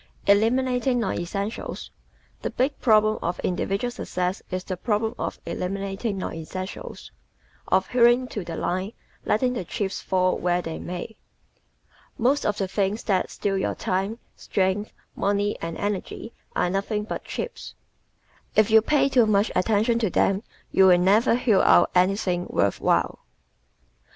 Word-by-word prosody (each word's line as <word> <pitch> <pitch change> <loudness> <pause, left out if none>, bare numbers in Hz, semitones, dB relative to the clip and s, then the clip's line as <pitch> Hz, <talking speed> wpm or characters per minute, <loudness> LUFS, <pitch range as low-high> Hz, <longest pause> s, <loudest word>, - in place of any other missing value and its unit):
Eliminating 245 +4 +2
Non 230 - -1
Essentials 200 +5 -4 0.5
¶ - - -36
The - - -2
big 270 +3 -1
problem 215 -2 +4
of 175 +1 -2
individual 195 +6 -1
success 180 -6 -3
is 185 0 -3
the 185 - -4
problem 220 +3 -1
of - - -3
eliminating 195 +3 -3
non 190 - -4
essentials 185 +4 -7 0.6
of 190 0 +2
"hewing 245 +1 +4
to 205 - -4
the 170 -1 -6
line, 185 +6 -2 0.3
letting 250 +3 +1
the 235 - -3
chips 190 +2 -3
fall 185 -1 +1
where 175 0 +1
they 165 -2 -5
may." 180 +5 -6 1.0
Most 265 +5 +2
of 210 - 0
the 195 - -1
things 200 +3 -1
that 190 -3 +1
steal 195 -1 -1
your - - -1
time, 195 +4 -2 0.2
strength, 195 +2 -1 0.2
money 205 +1 0
and 165 0 -4
energy 205 +3 -4 0.2
are 175 - +1
nothing 205 +2 -1
but 210 - -5
chips. 480 - -6 0.8
If 215 0 +4
you 220 0 +7
pay 285 +4 +2
too 250 -4 +4
much 205 0 +2
attention 220 +5 +2
to 220 -4 +1
them 195 +3 +2 0.3
you 190 - +5
will 180 -1 +7
never 205 +7 +4
hew 230 -6 +3
out 175 - +5
anything 180 -1 +1
worth 100 - 0
while. - - +1
200 Hz, 150 wpm, -25 LUFS, 185-225 Hz, 1.0 s, you